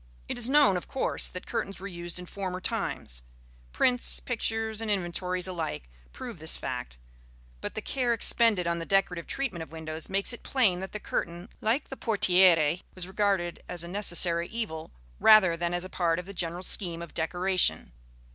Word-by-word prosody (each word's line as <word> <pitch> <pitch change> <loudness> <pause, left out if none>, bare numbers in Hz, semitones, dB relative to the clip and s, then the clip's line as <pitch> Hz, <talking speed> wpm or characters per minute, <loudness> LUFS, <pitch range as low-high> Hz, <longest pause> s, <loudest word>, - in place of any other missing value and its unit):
It - - -3
is 245 0 +2
known, 280 -9 +5
of 180 - -6
course, 265 - +1
that 180 - -8
curtains 210 -5 -3
were 195 - -8
used 175 -2 -5
in 180 - -5
former 185 0 -5
times: 60 - -3 0.5
prints, 245 - +2
pictures 225 -2 -2
and 225 - -3
inventories 185 -1 -1
alike 155 - -4 0.2
prove - - -8
this - - +1
fact; 60 -1 -5 0.6
but - - -5
the 220 - -4
care 250 -3 0
expended 225 -4 +3
on 170 0 0
the 165 - -4
decorative 185 -3 +1
treatment 260 -11 -3
of 160 - -8
windows 160 0 -5
makes 195 +5 0
it 240 - -9
plain 215 -10 +2
that 190 +1 -7
the 210 - -4
curtain, 175 +1 -4
like 230 +7 0
the 270 - -7
portière, 180 - +4
was 185 -1 -4
regarded 190 -3 0
as 175 -1 -2
a - - -7
necessary 175 -3 +2
evil 205 -9 -4 0.3
rather 210 -6 +7
than 170 +1 -2
as 175 +1 -2
part 170 -3 +1
of 180 - -5
the 200 - -8
general 175 0 -2
scheme 170 -3 +1
of 170 - -11
decoration. 180 - +1
185 Hz, 180 wpm, -28 LUFS, 170-210 Hz, 0.6 s, rather